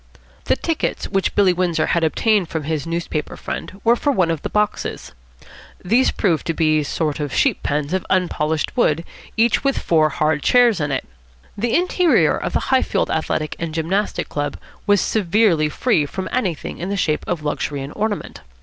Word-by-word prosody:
The - - +3
tickets 330 -2 -2
which 195 -1 -1
Billy 195 -3 +4
Windsor 175 -3 0
had 170 0 +1
obtained 195 +3 +2
from 160 -2 -3
his 155 0 -3
newspaper 165 -2 -3
friend 195 - -6
were 235 +1 +5
for 285 +4 0
one 185 -10 +2
of 160 -3 -3
the - - -4
boxes. 210 0 -2 0.7
These 235 +8 +4
proved 170 -7 0
to 165 - -1
be 155 -1 +2
sort 150 +1 -2
of 145 -2 -3
sheep - - +1
pens 150 +2 -1
of 190 - 0
unpolished 160 -4 0
wood, 165 - +2 0.3
each 230 +3 +3
with 275 -1 +1
four 155 -2 +2
hard 150 +1 0
chairs 240 - +4
in 145 -1 -1
it. 135 - -2 0.5
The 230 +3 0
interior 360 -1 +3
of - - -4
the - - -1
Highfield 260 - +1
Athletic 155 -1 -1
and 165 -1 -4
Gymnastic 185 +6 -1
Club 145 -1 -3 0.3
was 205 -2 +4
severely 185 -6 +2
free 155 - +1
from 190 +5 -5
anything 190 - -2
in 180 - -4
the 200 - -1
shape 155 -5 0
of 165 -4 -2
luxury 145 -1 -2
and 140 - -8
ornament. 210 -1 -3
170 Hz, 180 wpm, -20 LUFS, 155-210 Hz, 0.7 s, were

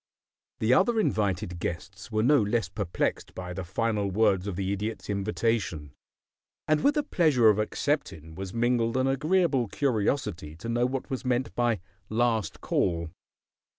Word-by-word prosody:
The 110 +3 +2
other 220 - +3
invited 95 - 0
guests 95 +6 -5
were 110 0 +1
no 145 +1 +5
less 110 +3 0
perplexed 100 -5 -2
by 90 -1 -5
the 95 +1 -4
final 105 +2 -1
words 95 -1 +2
of 100 - -3
the 95 +1 -1
Idiot's 105 +1 -4
invitation, 100 -6 -1 0.8
and 155 0 +2
with 290 +2 +4
the 295 - +1
pleasure 145 - +4
of 105 0 +3
accepting 105 - -2
was 95 +2 -6
mingled 120 +1 +1
an 130 - +2
agreeable 145 -1 +2
curiosity 105 - -1
to 90 +8 -8
know 120 +1 +1
what 135 +2 -4
was 130 -1 -3
meant 125 0 0
by 120 -5 +1 0.3
"Last 115 -1 0
Call." 85 -2 0
110 Hz, 150 wpm, -28 LUFS, 95-130 Hz, 0.8 s, no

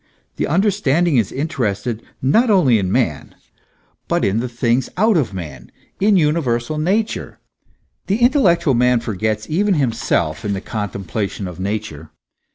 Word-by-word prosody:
45 - - -43
The - - -1
understanding 175 -4 +2
is 110 -5 +1
interested 120 -5 -2 0.2
not 225 - +3
only 150 - +4
in 95 -2 -2
man, - - -1 0.7
but - - +1
in 100 +3 +1
the 125 +1 -3
things 120 +1 0
out 215 +2 +3
of 145 -10 +1
man, 75 -9 -8 0.3
in 205 0 +4
universal 150 -4 0
Nature. 205 +8 -1 0.7
The 200 - +1
intellectual 175 - +3
man 125 0 +3
forgets 110 0 -2
even 195 +4 +1
himself 115 - 0
in 105 -1 -1
the 95 - -2
contemplation 100 -1 -4
of 90 0 -9
Nature. 95 -6 -4
125 Hz, 145 wpm, -19 LUFS, 105-170 Hz, 0.7 s, only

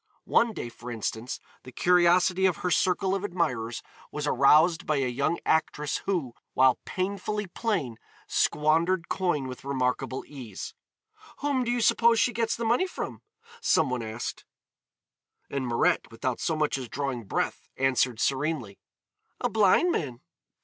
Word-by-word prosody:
One 235 - +3
day, 120 - -5
for 120 +1 -10
instance, 115 +1 -4 0.2
the 130 - -12
curiosity 180 +3 +4
of 180 - 0
her 180 - +1
circle 185 +3 +2
of 195 0 -1
admirers 125 - -2 0.3
was 150 0 -3
aroused 155 +5 +4
by 155 - +2
a 135 -2 +1
young 140 +7 0
actress 150 -2 +1
who, 165 -11 -1 0.2
while 130 -1 +5
painfully 200 +2 -2
plain, 175 - -2 0.3
squandered 165 +4 +1
coin 175 -8 0
with 130 -1 -8
remarkable 130 -1 -1
ease. 125 -9 -8 0.7
"Whom 280 -3 +1
do 240 - -3
you 240 0 +1
suppose 230 0 +4
she 245 - +2
gets 230 0 0
the 235 - -3
money 240 +12 +2
from?" - - -6 0.4
some 150 -5 +3
one 125 -1 -1
asked, 110 +1 -5 1.1
and 135 -2 -2
Mirette 115 -1 +1
without 120 +2 -3
so 160 - 0
much 150 -3 0
as 125 -3 -7
drawing 135 -4 -3
breath - - -2
answered 130 -3 +1
serenely, 135 -7 -1 0.6
"A - - 0
blind 220 - +4
man." 130 - -3
150 Hz, 150 wpm, -27 LUFS, 125-185 Hz, 1.1 s, while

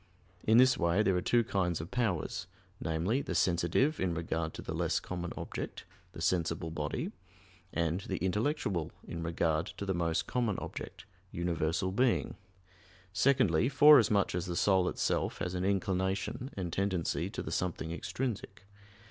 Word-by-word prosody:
In 110 +1 +5
this 130 +1 +6
way 85 +5 +3
there 95 -3 +2
are 90 - +1
two 120 +4 +3
kinds 90 -5 0
of 80 +3 -7
powers 100 -5 -1 0.3
namely, 85 - 0
the - - -4
"sensitive" 90 - +2
in 90 -3 0
regard 80 -1 -2
to - - -7
the - - -4
less - - 0
common 90 -1 -5
object - - -5 0.3
the 80 - -6
sensible 85 -2 0
body; 75 -2 -3 0.6
and 85 +2 0
the 95 -1 -3
"intellectual," 105 - -1 0.2
in 85 - -5
regard 80 -1 0
to 100 - -6
the 95 - 0
most 85 -2 0
common 120 -6 0
object - - -7 0.3
universal 85 +1 -1
being. 125 +4 +1 0.8
Secondly, 115 - +3
forasmuch 135 -8 +6
as 90 +1 -2
the 90 - -3
soul 95 0 +3
itself - - -1
has 90 - -3
an 90 0 -2
inclination 95 +5 -1
and 90 -4 -3
tendency 95 -4 0
to - - -5
the - - -5
something 85 -2 -2
extrinsic. 105 +3 -4
90 Hz, 155 wpm, -32 LUFS, 85-105 Hz, 0.8 s, this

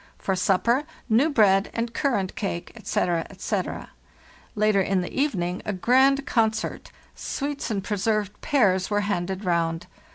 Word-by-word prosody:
For 190 - -1
supper: 200 +8 +2 0.3
new 240 +8 +4
bread 205 -7 +4
and 230 0 -2
currant 230 -9 -1
cake, 190 -4 -4
etc., 170 -2 -1
etc. - - -4 0.6
Later 210 -1 +3
in 190 0 +1
the 180 - -6
evening, 185 -11 -1
a 210 - -3
grand 265 +7 +3
concert. 220 -2 -1 0.2
Sweets 285 0 -4
and 200 -3 -2
preserved 210 0 -1
pears 190 -9 +2
were 205 0 +1
handed 190 -1 -2
round. 170 -1 0
205 Hz, 135 wpm, -25 LUFS, 185-235 Hz, 0.6 s, new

